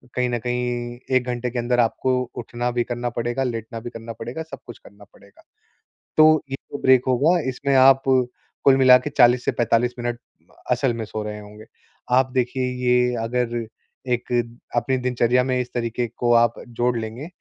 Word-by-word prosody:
कहीं 125 0 +1
न 120 - -1
कहीं 120 0 -3 0.2
1 125 - -2
घंटे 125 0 -2
के 120 - -3
अंदर 120 +1 0
आपको 120 +2 +1 0.2
उठना 120 +1 -3
भी 120 0 0
करना 120 0 -3
पड़ेगा, 120 +3 -2
लेटना 115 -1 -4
भी 120 - -6
करना 115 -1 -8
पड़ेगा, 120 +8 -6
सब 160 - -10
कुछ 120 - -10
करना 100 +1 -17
पड़ेगा। 100 - -21 0.7
तो 155 0 +6
ये 135 - -1 0.2
जो - - -4
ब्रेक 130 -1 +5
होगा, 145 +8 +3
इसमें 140 +2 -2
आप 135 0 +6
कुल 130 +1 +1
मिला 130 -1 +7
के 150 - -5
40 125 -3 +4
से - - +2
45 120 +1 +1
मिनट 120 0 -3 0.5
असल 130 -3 +1
में 115 - -4
सो 110 0 -5
रहे 105 0 -6
होंगे। 105 +1 -13 0.5
आप 130 0 +3
देखिए, 130 0 0 0.2
ये 125 0 +3
अगर 120 0 -2 0.5
एक 120 0 -3 0.4
अपनी 125 +2 +1
दिनचर्या 125 0 +1
में 130 -1 0
इस 125 0 -3
तरीके 120 0 -2
को 120 -1 +2
आप 115 0 +4
जोड़ 120 0 -1
लेंगे 115 +7 -6
120 Hz, 185 wpm, -22 LUFS, 120-125 Hz, 0.7 s, मिला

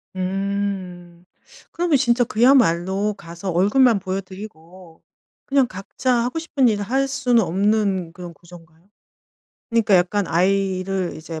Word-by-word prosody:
음. 185 -2 -4 0.5
그러면 340 -4 +1
진짜 245 -1 +2
그야말로 210 -5 +2
가서 175 +1 -7
얼굴만 210 +6 +3
보여드리고 185 -3 -9 0.4
그냥 270 -2 +2
각자 195 +6 -3
하고 250 +7 -3
싶은 285 -5 +1
일을 210 -3 0
할 265 +6 0
수는 250 -3 +1
없는 195 -1 0
그런 175 -1 -9
구조인가요? 170 0 -18 0.8
그러니까 225 -3 +2
약간 185 +3 +1
아이를 190 +1 0
이제 160 0 -8
195 Hz, 280 characters per minute, -21 LUFS, 175-230 Hz, 0.8 s, 얼굴만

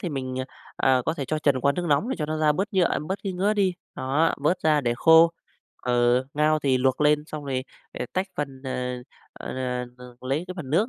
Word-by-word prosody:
thì 180 - -3
mình, 130 -4 -4
à, - - -3 0.3
à, 130 -1 +3
có 160 - +1
thể 145 - -4
cho 155 +4 -2
chần 140 -4 +2
qua 140 - +3
nước 175 +4 -3
nóng 150 +10 +2
để 265 - -2
cho 150 - -2
nó 155 +1 -2
ra 155 -1 +4
bớt 195 +8 -2
nhựa, 180 -3 +2
bớt 190 +2 -2
cái 195 - -2
ngứa 190 +4 +1
đi, 195 -3 +1 0.2
đó, 145 +5 +1
vớt 150 +6 0
ra 155 -1 +3
để 120 -3 0
khô. 165 +2 +6 0.5
Ờ, 120 +1 +2
ngao 155 +1 +3
thì 135 -3 +1
luộc 130 +2 +1
lên 150 0 +3
xong 155 -2 -7
rồi, 130 -2 -2 0.3
à, - - -4
tách 185 +1 0
phần 135 -2 -4
à, 125 -1 -3 0.5
n - - -5 0.3
n 120 0 -20 0.2
lấy 135 +6 -2
cái 185 - -6
phần 150 -8 -7
nước 190 +10 +2
150 Hz, 235 wpm, -25 LUFS, 130-170 Hz, 0.5 s, khô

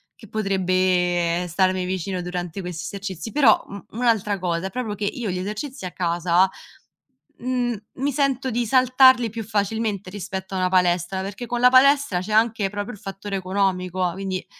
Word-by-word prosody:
che 220 - -15
potrebbe 185 -4 +1
starmi 185 +1 +1
vicino 185 0 -3
durante 180 +1 -4
questi 180 -1 -6
esercizi, 195 +2 -6
però 265 -7 +4
u 200 0 -9
un'altra 220 -4 +1
cosa 175 0 -2
è - - -6
proprio 230 -1 -4
che 210 - -3
io 220 +1 -3
gli 180 - -3
esercizi 215 +6 -5
a 180 - -5
casa, 175 +1 +2 0.9
mhmm, 245 -1 -1 0.2
mi 275 +3 -1
sento 270 -1 0
di 240 +1 0
saltarli 255 0 +5
più 225 +1 -5
facilmente 210 -1 -2
rispetto 190 -1 -6
a - - -1
una 185 0 +1
palestra, 180 0 +1
perché 195 +4 -6
con 240 +1 -2
la 250 - +7
palestra 275 -5 +5
c'è 185 - -6
anche 220 -2 +2
proprio 205 +4 -5
il 210 - -12
fattore 195 0 -5
economico, 185 -1 0
quindi 190 0 -4
195 Hz, 170 wpm, -23 LUFS, 185-230 Hz, 0.9 s, la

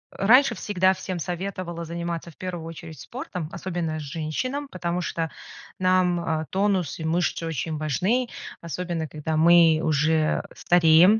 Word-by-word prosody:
раньше 240 +4 +5
всегда 190 -2 +2
всем 185 -1 -5
советовала 175 -1 -4
заниматься 170 0 -4
в - - -25
1 175 -3 -5
очередь 165 -2 -9
спортом, 185 - -6
особенно 170 -4 -3
женщинам, 160 - -3
потому 175 -1 -2
что 165 -2 -2 0.5
нам, 185 -1 +3
а, 160 -2 -1
тонус 190 -5 0
и - - -5
мышцы 165 +1 0
очень 160 0 -3
важны, 190 - 0 0.3
особенно 170 -1 -3
когда 155 +1 -3
мы 165 -1 +6
уже 155 0 +2
стареем, 175 +4 +6
170 Hz, 135 wpm, -25 LUFS, 160-185 Hz, 0.5 s, мы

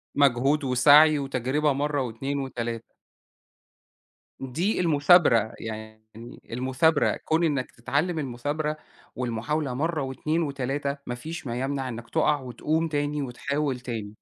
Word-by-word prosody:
مجهود 140 +2 +3
وسعي 145 +4 +6
وتجربة 135 +2 0
مَرّة 145 0 -1
و2 135 +4 -3
و3. 120 -3 -4 1.5
دي 165 - -1
المثابرة، 145 - +4
يعني 110 0 -8 0.5
المثابرة، 130 +6 +2
كون 160 +2 +2
إنك 140 -5 0
تتعلم 155 +8 -1
المثابرة 145 +4 -3 0.4
والمحاولة 125 +4 -2
مَرّة 155 +3 -1
و2 155 +5 -1
و3، 140 0 -2
ما 120 - -4
فيش 160 +4 -7
ما 120 +1 -3
يمنع 135 0 -2
إنك 115 -1 -8
تقع 150 -2 +2
وتقوم 150 +6 -1
تاني 145 -1 -1
وتحاول 140 +1 -2
تاني. 110 -4 -5
140 Hz, 120 wpm, -26 LUFS, 125-150 Hz, 1.5 s, وسعي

